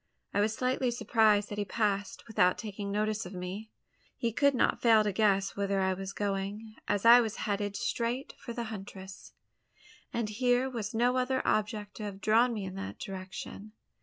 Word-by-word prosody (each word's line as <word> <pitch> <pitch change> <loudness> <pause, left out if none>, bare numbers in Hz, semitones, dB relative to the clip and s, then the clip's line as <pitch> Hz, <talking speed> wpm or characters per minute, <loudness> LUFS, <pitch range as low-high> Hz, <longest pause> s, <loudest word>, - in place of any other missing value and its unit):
I 205 - +2
was 215 +1 +1
slightly 255 0 0
surprised 220 -3 +3
that 205 - -4
he - - +1
passed, 200 -1 -1
without 180 -5 +3
taking 205 -2 -5
notice 215 0 -1
of 185 - -9
me! 185 +4 -6 0.5
He 230 -2 -1
could 280 +2 +3
not - - +2
fail 225 -2 +6
to 210 - 0
guess 195 -1 +2
whither 200 -1 0
I 190 0 +2
was 190 +1 -5
going: 205 +2 -3
as 205 +2 0
I 240 +1 +9
was 225 -2 -2
heading 205 -1 -1
straight 240 +3 -2
for 235 - -7
the 235 0 -3
huntress; 190 -1 -9 0.8
and 230 -2 -1
here 245 +3 +2
was 225 -3 -4
no 245 +3 +3
other 260 +1 0
object 210 -1 -1
to 215 - -6
have 200 -1 -6
drawn 225 +5 +4
me 210 -4 -3
in 185 - -6
that 195 - -6
direction. 190 +2 -7
210 Hz, 185 wpm, -30 LUFS, 200-230 Hz, 0.8 s, I